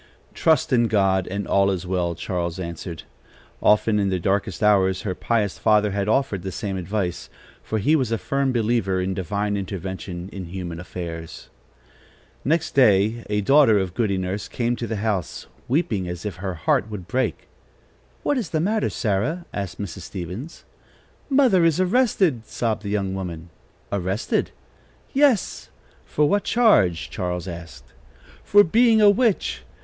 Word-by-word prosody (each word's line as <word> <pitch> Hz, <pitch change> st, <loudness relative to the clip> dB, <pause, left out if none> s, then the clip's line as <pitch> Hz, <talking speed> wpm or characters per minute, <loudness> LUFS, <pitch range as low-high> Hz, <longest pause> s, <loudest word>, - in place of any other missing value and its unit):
"Trust 160 Hz, -4 st, +2 dB
in 120 Hz, -2 st, +4 dB
God, 95 Hz, -3 st, +2 dB
and 100 Hz, +2 st, -4 dB
all 100 Hz, 0 st, +3 dB
is 95 Hz, -2 st, -2 dB
well!" 90 Hz, -2 st, -1 dB
Charles 85 Hz, 0 st, -3 dB
answered. 85 Hz, -1 st, -6 dB, 0.6 s
Often, 105 Hz, 0 st, +3 dB
in 100 Hz, -1 st, +1 dB
their 95 Hz, -, 0 dB
darkest 95 Hz, +2 st, -1 dB
hours, 95 Hz, -2 st, +3 dB
her 100 Hz, -4 st, -2 dB
pious 105 Hz, 0 st, -1 dB
father 105 Hz, -1 st, +3 dB
had 100 Hz, 0 st, -1 dB
offered 110 Hz, -4 st, +1 dB
the 95 Hz, +1 st, -5 dB
same 100 Hz, +1 st, -4 dB
advice, 95 Hz, -1 st, -3 dB, 0.3 s
for 110 Hz, -, -3 dB
he 145 Hz, +10 st, +3 dB
was 130 Hz, -7 st, 0 dB
a 115 Hz, -, +1 dB
firm 135 Hz, +3 st, -1 dB
believer 110 Hz, -5 st, +1 dB
in 95 Hz, +1 st, -1 dB
divine 100 Hz, +3 st, -2 dB
intervention 95 Hz, -2 st, -5 dB
in 95 Hz, -3 st, -7 dB
human 85 Hz, -1 st, -6 dB
affairs. 85 Hz, -2 st, -7 dB, 0.9 s
Next 160 Hz, +3 st, +1 dB
day 110 Hz, -2 st, +4 dB
a 105 Hz, 0 st, +1 dB
daughter 135 Hz, -1 st, +5 dB
of 95 Hz, -3 st, -1 dB
Goody 100 Hz, -2 st, 0 dB
Nurse 95 Hz, +2 st, -3 dB
came 120 Hz, 0 st, -1 dB
to 115 Hz, -, -4 dB
the 110 Hz, -, -3 dB
house, 100 Hz, -5 st, -2 dB, 0.2 s
weeping 125 Hz, -, 0 dB
as 90 Hz, +2 st, -6 dB
if 100 Hz, -5 st, -4 dB
her 95 Hz, 0 st, -4 dB
heart 95 Hz, +6 st, +1 dB
would 100 Hz, -5 st, -7 dB
break. 130 Hz, 0 st, -2 dB, 0.8 s
"What 285 Hz, -, +1 dB
is 215 Hz, -, -4 dB
the 155 Hz, -, 0 dB
matter, 210 Hz, +6 st, +1 dB
Sarah?" 130 Hz, -, -1 dB
asked 100 Hz, -3 st, -5 dB
Mrs. 100 Hz, -1 st, -5 dB
Stevens. 95 Hz, -, -7 dB, 0.6 s
"Mother 260 Hz, -10 st, +4 dB
is 165 Hz, 0 st, +3 dB
arrested!" 185 Hz, -, +2 dB
sobbed 115 Hz, -3 st, -2 dB
the 100 Hz, -, -5 dB
young 100 Hz, -2 st, -1 dB
woman. 85 Hz, -3 st, -6 dB, 0.4 s
"Arrested!" 95 Hz, +2 st, -1 dB, 0.6 s
"Yes." 275 Hz, -7 st, +2 dB, 0.4 s
"For 150 Hz, 0 st, +1 dB
what 205 Hz, +5 st, +1 dB
charge?" 105 Hz, -, +3 dB
Charles 90 Hz, 0 st, -3 dB
asked. 85 Hz, -2 st, -9 dB, 0.5 s
"For 205 Hz, 0 st, +6 dB
being 225 Hz, +4 st, +4 dB
a 205 Hz, -1 st, +7 dB
witch. 200 Hz, -, +1 dB
100 Hz, 155 wpm, -23 LUFS, 95-130 Hz, 0.9 s, a